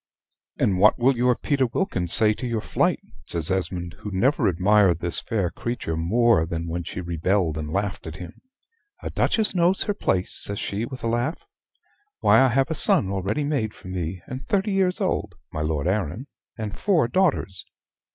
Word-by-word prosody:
"And 95 -3 +1
what 105 +3 +5
will 130 +2 +3
your 125 +1 +2
Peter 140 -1 0
Wilkins 95 - -2
say 110 -1 +4
to 125 +4 -5
your 115 -2 -1
flight?" - - 0 0.3
says 85 +1 0
Esmond, 90 -2 -3
who 105 - -6
never 125 +10 +2
admired 95 0 +3
this 85 0 -2
fair 100 -6 -1
creature 120 -9 -4
more 95 +2 +2
than 85 -1 -4
when 85 +1 -3
she 90 +2 -6
rebelled 85 0 0
and 75 -1 -5
laughed 100 -1 -3
at 80 - -7
him. 85 +2 -10 0.6
"A - - -4
duchess 220 -3 +1
knows 180 +1 +2
her 205 - -1
place," 95 - -1
says 100 - -2
she, 100 +4 -3
with 130 0 -9
a - - 0
laugh. 120 - -2 0.7
"Why, - - +5
I 135 - +5
have 135 +4 +1
a - - +2
son 100 -9 +4
already 100 +9 -1
made 140 -8 -2
for 95 - -12
me, 90 -1 -4
and 130 +1 -7
thirty 200 +1 0
years 190 -2 +1
old 105 - -2 0.2
(my 75 - -3
Lord 75 -1 -1
Arran), 100 - -2 0.3
and 110 -3 -5
four 175 - +2
daughters. 125 - 0
105 Hz, 185 wpm, -24 LUFS, 90-130 Hz, 0.7 s, what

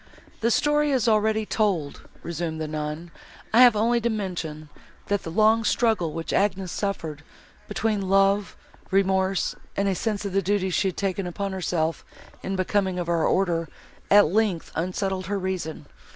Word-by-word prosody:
"The 230 - +1
story 295 +4 +2
is 255 -4 +1
already 220 0 +2
told," 190 -11 -1
resumed 165 -1 -4
the 155 - -3
nun, 155 +2 -5 0.4
"I 235 - +7
have 245 -3 +8
only 235 +3 +2
to 235 - +1
mention, 175 -8 -4 0.4
that 205 -2 +1
the - - -7
long 220 +5 +3
struggle, 220 -8 +1
which 165 +1 -4
Agnes 195 -3 +1
suffered, 160 -7 -3 0.5
between 210 -4 -1
love, 195 +1 +2 0.3
remorse 190 0 +1 0.2
and 200 0 +1
a 195 - +2
sense 210 +1 -2
of 200 - -3
the 195 - +2
duties 190 -1 0
she 195 - +2
had 185 - -3
taken 195 -1 -1
upon 195 +3 -3
herself 165 -3 -1 0.4
in 195 - -3
becoming 185 0 0
of 175 -1 -3
our 170 -2 +2
order, 170 -4 +1 0.4
at 205 0 +7
length 195 -1 0
unsettled 185 +2 -2
her 205 +1 -1
reason. 185 -5 -4
195 Hz, 165 wpm, -25 LUFS, 170-210 Hz, 0.5 s, have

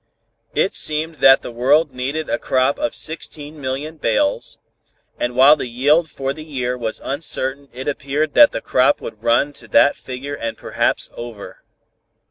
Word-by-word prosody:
It - - +1
seemed 155 +1 +2
that 135 0 +6
the - - -7
world 135 +5 +2
needed 140 +5 -3
a - - -1
crop 130 +2 0
of 150 - -2
16,000,000 150 -1 -3
bales, 105 -3 0 0.6
and 120 0 -2
while 135 +4 +7
the 145 - -5
yield 145 +7 +2
for 135 -2 -4
the 155 +1 -10
year 125 -5 -3
was 115 -3 -4
uncertain 140 -1 -1
it 130 +2 -8
appeared 145 +1 -2
that 295 -1 +7
the - - -4
crop 130 +3 +2
would 110 -1 -9
run 120 +6 +1
to - - -15
that 145 - +4
figure 135 +2 -7
and 115 -5 -5
perhaps - - -1
over. 120 -4 -9
140 Hz, 160 wpm, -19 LUFS, 125-150 Hz, 0.6 s, while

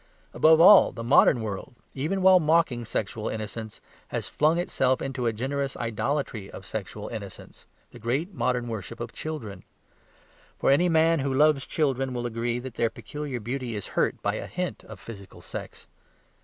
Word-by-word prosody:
Above 160 0 +5
all, 190 +3 +8
the 115 - -7
modern 120 0 +5
world 105 +4 -6 0.2
(even 170 +8 -2
while 190 -1 +7
mocking 155 -7 +2
sexual 110 -1 -3
innocence) 110 0 -6 0.3
has - - -4
flung 155 +3 +2
itself 130 -7 +1
into 130 -3 -3
a - - +2
generous 135 +4 -3
idolatry 115 -2 -2
of 95 - -10
sexual 105 +1 -6
innocence 100 -5 -9 0.2
the - - -12
great 140 - -2
modern 125 -6 -1
worship 115 0 -6
of 120 0 -6
children. 115 -12 -6 1.0
For - - +2
any 175 +6 +4
man 165 0 +4
who 135 0 -1
loves 145 0 +3
children 135 -4 0
will 120 0 -3
agree 120 0 -2
that 125 0 -7
their 115 -1 +1
peculiar 145 0 -6
beauty 120 +1 -4
is 100 - -5
hurt - - 0
by - - 0
a - - -6
hint - - -4
of - - -11
physical 100 -4 -11
sex. - - -8
125 Hz, 170 wpm, -26 LUFS, 115-150 Hz, 1.0 s, all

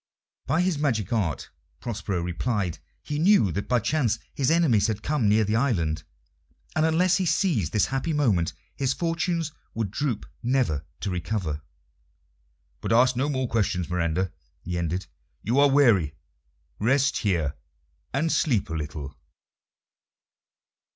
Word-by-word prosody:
By 160 +5 +2
his 180 -5 0
magic 120 - 0
art, 85 -11 -1 0.3
Prospero 100 -6 -3
replied, 90 -1 -2 0.2
he 145 0 -3
knew 170 - +5
that 100 +5 -3
by 125 - +3
chance 120 -1 +1 0.2
his 135 -1 +1
enemies 160 -11 +4
had 110 -1 -3
come 145 -8 +1
near 110 +1 +4
the 105 +1 0
island, 85 - +1 0.7
and 155 +1 +3
unless 175 +3 +3
he 190 - 0
seized 155 - +1
this 105 - +3
happy 135 +5 -2
moment 110 - +2 0.2
his 135 -1 0
fortunes 165 -1 -1 0.2
would 110 -4 -2
droop, 130 -2 -2 0.2
never 120 - 0
to 100 - -2
recover. 90 -4 -2 1.2
"But - - -3
ask 125 +2 +5
no 135 +4 0
more 130 -3 -1
questions, 95 -6 0
Miranda," 90 +1 0 0.3
he 90 - -4
ended. 85 +2 -2 0.4
"You 120 +5 +2
are 145 0 +6
weary; 110 - +4 0.6
rest 135 +5 +2
here 85 -9 0 0.6
and 155 +5 0
sleep 115 - +1
a - - -2
little." 75 -2 -5
115 Hz, 140 wpm, -26 LUFS, 90-145 Hz, 1.2 s, are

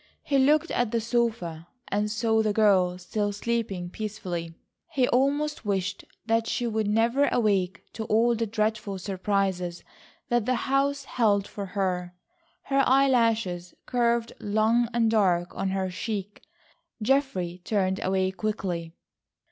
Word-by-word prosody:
He 275 -1 +2
looked 300 +5 +3
at 245 -2 +1
the 230 - 0
sofa 220 -8 -1 0.2
and 210 +1 0
saw 220 0 +1
the 215 -1 +1
girl 190 -4 +3
still 205 +3 -2
sleeping 205 -4 -2
peacefully. 180 -6 -5 0.3
He 255 -2 +2
almost 285 +4 +1
wished 200 -1 -2 0.2
that 225 0 +1
she 245 - -1
would 220 -2 0
never 230 +6 +3
awake 200 -6 +1
to 220 - -4
all 230 +3 +3
the 230 0 -1
dreadful 215 -2 -1
surprises 190 -2 -1 0.5
that 240 -2 +1
the 255 - +2
house 275 +1 +1
held 210 -6 +1
for 200 -1 -6
her. 180 -2 -2 0.5
Her 275 0 +2
eye 275 +2 +5
lashes 220 -8 +1
curved 235 -1 +1
long 220 +3 +2
and 230 -2 +2
dark 180 -5 +2
on 195 - -1
her 190 -1 -1
cheek. 205 +1 -4 0.6
Geoffrey 210 -9 0
turned 190 -2 0
away 190 0 +1
quickly. 180 -4 -3
215 Hz, 140 wpm, -26 LUFS, 190-235 Hz, 0.6 s, eye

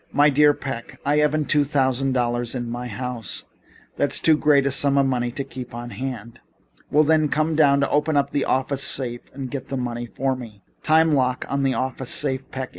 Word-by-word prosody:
"My 145 +1 +4
dear 150 +1 +5
Mr. - - -8
Peck, 125 -4 -6
I 145 +1 +2
haven't 150 0 +2
two 145 -1 +4
thousand 135 -2 0
dollars 120 -1 -1
in 120 -2 -4
my 120 +1 -5
house. 120 0 -5 0.5
That 145 -1 0
is - - +3
too 160 - +4
great 150 -2 +3
a 140 - +1
sum 140 +1 +4
of 140 - +4
money 125 -2 0
to 140 - -3
keep 125 -3 -9
on 120 0 -7
hand." 120 0 -6 0.5
"Well, 150 +2 +4
then, 155 0 +2
come 155 +2 0
downtown, 140 -2 +4
open 150 +1 +1
up 140 0 +1
the 140 - 0
office 135 +1 0
safe 120 -3 0
and 130 -2 -7
get 140 -2 -5
the 135 - -4
money 120 -1 -4
for 135 +3 -2
me." 110 -6 -11 0.2
"Time 160 +1 +3
lock 130 -3 0
on 140 0 -1
the 135 -1 +1
office 130 -1 -3
safe, 135 -2 0
Peck. 130 -1 -5
135 Hz, 215 wpm, -22 LUFS, 125-145 Hz, 0.5 s, dear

